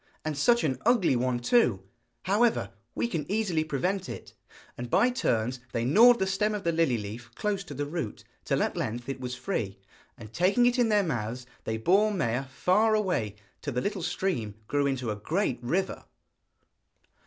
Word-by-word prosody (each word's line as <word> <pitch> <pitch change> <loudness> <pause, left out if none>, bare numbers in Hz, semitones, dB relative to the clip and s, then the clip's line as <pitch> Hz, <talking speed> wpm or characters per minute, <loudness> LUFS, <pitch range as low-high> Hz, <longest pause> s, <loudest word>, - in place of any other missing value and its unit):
'And 155 -1 -1
such 235 +12 +3
an 135 -5 0
ugly 220 - +3
one 125 0 0
too! 120 - +2 0.4
However, 215 +5 +2 0.2
we - - 0
can 165 -7 -4
easily 195 -7 +1
prevent 180 +6 -2
it.' - - -8 0.4
And 120 0 -6
by 245 - +4
turns 125 - 0
they 115 0 0
gnawed 235 - +7
the 190 - 0
stem 210 +3 0
of 205 - -5
the 170 - +1
lily 160 -7 +2
leaf 110 +3 -7
close 205 -2 -1
to 145 - -8
the 145 +2 -2
root, 145 -7 -5 0.2
till - - +1
at - - -2
length 120 +2 -3
it 135 -1 -4
was 125 0 -4
free, 115 - -3 0.4
and 110 -1 -11
taking 200 +8 +3
it 245 +1 +2
in 240 -2 +3
their 210 -1 +4
mouths 120 - -3 0.2
they 110 - -1
bore 195 - +3
Maia 135 - -1
far 190 +11 +2
away, 165 - 0 0.3
till 145 - -4
the 125 - 0
little 200 +2 -2
stream 170 - -2
grew 145 -1 +1
into 130 -4 -1
a - - -2
great 155 - -1
river. 175 +11 -2
155 Hz, 185 wpm, -28 LUFS, 120-200 Hz, 0.4 s, gnawed